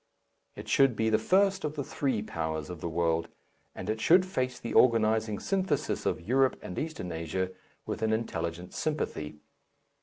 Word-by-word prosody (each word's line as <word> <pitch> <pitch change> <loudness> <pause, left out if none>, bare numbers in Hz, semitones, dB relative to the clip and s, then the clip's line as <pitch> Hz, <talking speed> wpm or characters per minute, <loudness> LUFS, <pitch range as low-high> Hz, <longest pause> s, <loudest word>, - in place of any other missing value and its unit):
It - - -9
should 135 -4 +4
be 110 0 +1
the 110 - +4
first 195 - +3
of 150 0 -2
the 145 - -2
three 130 -6 -1
powers 80 -3 -3
of 85 -3 -8
the 85 - -2
world, 85 0 +1 0.5
and 95 - -6
it 110 +1 -1
should 180 +7 +6
face 130 -9 -2
the 115 - -5
organizing 110 -3 +4
syntheses 190 -1 -1
of - - 0
Europe 130 +2 +3
and 90 - -5
Eastern 155 - -4
Asia 85 +3 -2 0.3
with - - -4
an 110 0 +1
intelligent 90 -6 -3
sympathy. 80 - -2
110 Hz, 170 wpm, -29 LUFS, 85-135 Hz, 0.5 s, should